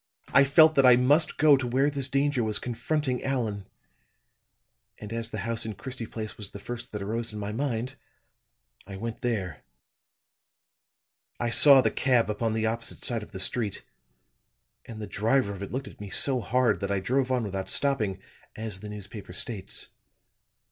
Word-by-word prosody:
I 140 Hz, +1 st, +5 dB
felt 155 Hz, +3 st, +6 dB
that 135 Hz, -, +3 dB
I 125 Hz, -1 st, +7 dB
must 145 Hz, +6 st, +3 dB
go 150 Hz, -2 st, +6 dB
to 130 Hz, -2 st, -3 dB
where 130 Hz, +4 st, +1 dB
this 140 Hz, -2 st, 0 dB
danger 140 Hz, -2 st, 0 dB
was 110 Hz, -1 st, 0 dB
confronting 130 Hz, +2 st, -3 dB
Allan; 110 Hz, -7 st, -3 dB, 1.3 s
and 105 Hz, +1 st, -8 dB
as 115 Hz, 0 st, -2 dB
the 110 Hz, -3 st, -5 dB
house 115 Hz, -1 st, -2 dB
in 110 Hz, -2 st, -5 dB
Christie 115 Hz, +3 st, -5 dB
Place 110 Hz, -1 st, -7 dB
was 105 Hz, -2 st, +1 dB
the 100 Hz, -, -10 dB
first 120 Hz, +3 st, -8 dB
that 105 Hz, -2 st, -5 dB
arose 115 Hz, +3 st, -3 dB
in 105 Hz, -, -8 dB
my 105 Hz, 0 st, -4 dB
mind, 125 Hz, +1 st, -3 dB, 0.9 s
I 100 Hz, -1 st, -8 dB
went 115 Hz, +3 st, -6 dB
there. 95 Hz, -, -3 dB, 1.8 s
"I 120 Hz, -1 st, -1 dB
saw 140 Hz, +2 st, +9 dB
the -, -, +1 dB
cab 125 Hz, -5 st, +1 dB
upon 110 Hz, +1 st, -2 dB
the 110 Hz, 0 st, -1 dB
opposite 115 Hz, +1 st, -4 dB
side 115 Hz, -2 st, +1 dB
of 105 Hz, -, -12 dB
the 95 Hz, -, -8 dB
street; 105 Hz, +1 st, +2 dB, 1.0 s
and 110 Hz, -2 st, -9 dB
the 105 Hz, -, -5 dB
driver 110 Hz, +2 st, 0 dB
of 100 Hz, -, -10 dB
it 100 Hz, -, -6 dB
looked 130 Hz, +2 st, -4 dB
at -, -, -13 dB
me 100 Hz, -, -7 dB
so 130 Hz, +6 st, +2 dB
hard 125 Hz, -1 st, +1 dB
that 100 Hz, -, -4 dB
I 100 Hz, -1 st, 0 dB
drove 130 Hz, +6 st, -1 dB
on 125 Hz, -2 st, 0 dB
without 95 Hz, -2 st, -5 dB
stopping, 110 Hz, -10 st, +1 dB, 0.4 s
as 110 Hz, -3 st, -5 dB
the 105 Hz, -, -9 dB
newspaper 100 Hz, -2 st, -9 dB
states. 95 Hz, +1 st, -3 dB
115 Hz, 180 wpm, -26 LUFS, 105-130 Hz, 1.8 s, saw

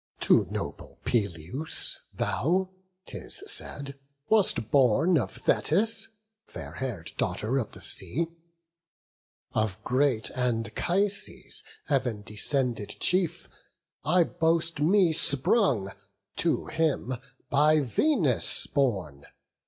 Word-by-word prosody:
To -, -, +4 dB
noble -, -, -6 dB
Peleus 100 Hz, -, -1 dB
thou, 180 Hz, -, -1 dB, 0.3 s
'tis 400 Hz, -, -3 dB
said, 140 Hz, -, -2 dB, 0.3 s
wast 200 Hz, -, +3 dB
born 140 Hz, +6 st, +4 dB
Of 120 Hz, -, -4 dB
Thetis, 220 Hz, +8 st, +2 dB, 0.4 s
fair -, -, -9 dB
hair'd 120 Hz, -11 st, -5 dB
daughter 125 Hz, +6 st, 0 dB
of 110 Hz, -, -5 dB
the -, -, -7 dB
sea; 155 Hz, -, +1 dB, 1.3 s
Of 110 Hz, -3 st, -2 dB
great 130 Hz, -3 st, +1 dB
Anchises, 130 Hz, -, -1 dB, 0.2 s
Heav'n 125 Hz, -7 st, -1 dB
descended 115 Hz, +1 st, -2 dB
chief, 175 Hz, -2 st, +1 dB, 0.6 s
I 175 Hz, +4 st, +4 dB
boast 165 Hz, 0 st, 0 dB
me 175 Hz, +2 st, +3 dB
sprung, 140 Hz, -, +2 dB, 0.5 s
to -, -, 0 dB
him 150 Hz, -6 st, -1 dB, 0.4 s
by 150 Hz, +2 st, +4 dB
Venus 145 Hz, -, +3 dB
borne. 95 Hz, -, -2 dB
140 Hz, 95 wpm, -27 LUFS, 115-170 Hz, 1.3 s, To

